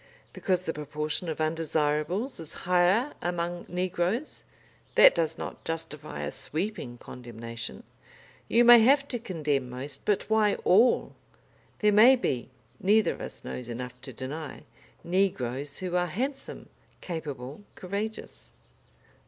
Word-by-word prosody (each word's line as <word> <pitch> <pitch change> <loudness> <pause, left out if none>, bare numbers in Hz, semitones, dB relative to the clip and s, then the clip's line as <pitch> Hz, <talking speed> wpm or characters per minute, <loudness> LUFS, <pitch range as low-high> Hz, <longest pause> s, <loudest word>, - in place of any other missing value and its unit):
Because 185 -2 0
the 165 - -2
proportion 150 +3 -3
of 160 - -4
undesirables 155 - 0
is 160 -2 -6
higher 180 +9 +3
among 175 0 -2
negroes, 180 - -1 0.5
that - - +9
does - - 0
not - - -7
justify 155 -2 -4
a - - -3
sweeping 160 - -3
condemnation. 115 - -8 0.6
You 240 +1 +4
may 240 0 +10
have 275 +5 +5
to 245 - -2
condemn 150 - -1
most, 135 +3 -5
but 205 -2 +1
why 220 -2 +3
all? 225 +7 +4 0.7
There 210 -1 +5
may 235 +6 +8
be 130 - -2 0.3
neither 210 +3 +4
of - - -11
us - - -7
knows 125 -1 -6
enough 125 +1 -6
to 130 - -8
deny 140 +5 -6 0.4
negroes 145 -7 0
who 180 -1 -3
are 180 0 +2
handsome, 260 - -4 0.3
capable, 150 -3 -6
courageous." 205 +4 -5
175 Hz, 130 wpm, -28 LUFS, 145-210 Hz, 0.7 s, may